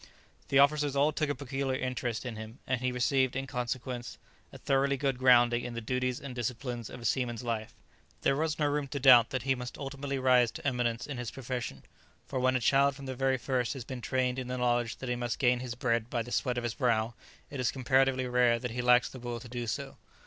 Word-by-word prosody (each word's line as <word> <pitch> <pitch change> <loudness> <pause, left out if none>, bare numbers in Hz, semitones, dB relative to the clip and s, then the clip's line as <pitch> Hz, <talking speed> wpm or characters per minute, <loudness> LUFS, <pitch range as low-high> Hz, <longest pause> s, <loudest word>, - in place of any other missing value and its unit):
The 135 - +2
officers 145 0 +4
all 145 +2 +3
took 155 -1 -1
a 145 - 0
peculiar 135 0 -2
interest 125 -2 -3
in 120 -3 -4
him, 110 +2 -8
and 130 -2 -1
he 130 0 0
received, 130 +1 +1
in 135 0 -2
consequence, 125 -1 -4 0.3
a - - -10
thoroughly 140 0 +1
good 135 -2 -1
grounding 120 -2 +5
in 120 -1 -5
the - - -2
duties 125 +2 -1
and 135 -2 -7
discipline 120 0 -3
of 125 - -9
a - - -8
seaman's 120 -1 -1
life. 115 -2 -3 0.5
There 135 - +3
was 155 +1 -1
no 150 - +1
room 145 -1 0
to 140 +1 -4
doubt 125 -4 +7
that 130 -3 -3
he 135 0 +2
must 125 -1 -6
ultimately 140 0 -4
rise 125 -2 +4
to - - -9
eminence 120 -2 0
in 140 -4 -6
his 120 -2 -3
profession, 125 - -5 0.4
for 130 - -3
when 130 0 +2
a - - +3
child 140 +3 +3
from 140 0 -10
the 130 - -4
very 135 +1 +1
first 125 -2 -1
has 135 -4 -6
been 130 -1 -6
trained 130 0 0
in 130 - -5
the 125 0 -3
knowledge 120 -1 +1
that 130 - -7
he 125 - 0
must 120 -1 -2
gain 125 -1 +3
his 125 -1 -5
bread 115 -3 0
by 120 -2 -1
the 120 - -10
sweat 125 -1 0
of 120 - -2
his 120 -2 -2
brow, 115 -4 +1 0.4
it 140 - -5
is 125 - +1
comparatively 130 0 +2
rare 125 -1 +3
that 125 0 -4
he 125 +2 -2
lacks 125 0 +5
the 130 - -10
will 120 -1 -5
to 120 - -11
do 120 0 -5
so. 110 - -4
125 Hz, 240 wpm, -30 LUFS, 120-135 Hz, 0.5 s, doubt